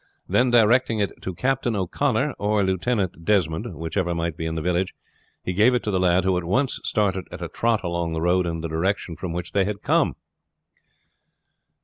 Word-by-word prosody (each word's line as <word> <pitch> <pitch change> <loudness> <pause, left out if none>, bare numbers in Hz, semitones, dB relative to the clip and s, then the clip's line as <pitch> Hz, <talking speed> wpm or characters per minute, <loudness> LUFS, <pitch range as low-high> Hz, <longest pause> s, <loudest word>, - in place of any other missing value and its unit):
Then 125 +1 +3
directing 120 0 +4
it 100 -2 -2
to 95 - -5
Captain 125 0 0
O'Connor 95 -3 0
or 105 0 +1
Lieutenant 95 -1 -1
Desmond, 85 -4 0
whichever 85 +3 -2
might 85 -1 -2
be 80 0 -4
in 80 - -3
the 80 - -2
village, 90 +2 0 0.5
he 90 - -2
gave 110 +7 +4
it 120 - 0
to 105 - -1
the 95 - +1
lad, 90 0 +3
who 95 -1 +2
at - - -7
once 120 +10 0
started 95 -3 0
at - - -7
a - - -3
trot 115 -2 0
along 85 -1 -2
the 80 - -2
road 90 +1 +2
in 80 -1 -3
the 85 - -3
direction 85 +2 -1
from 90 0 -5
which 85 0 -4
they 100 - +2
had 100 +1 -4
come. - - +2
95 Hz, 200 wpm, -24 LUFS, 85-105 Hz, 0.5 s, directing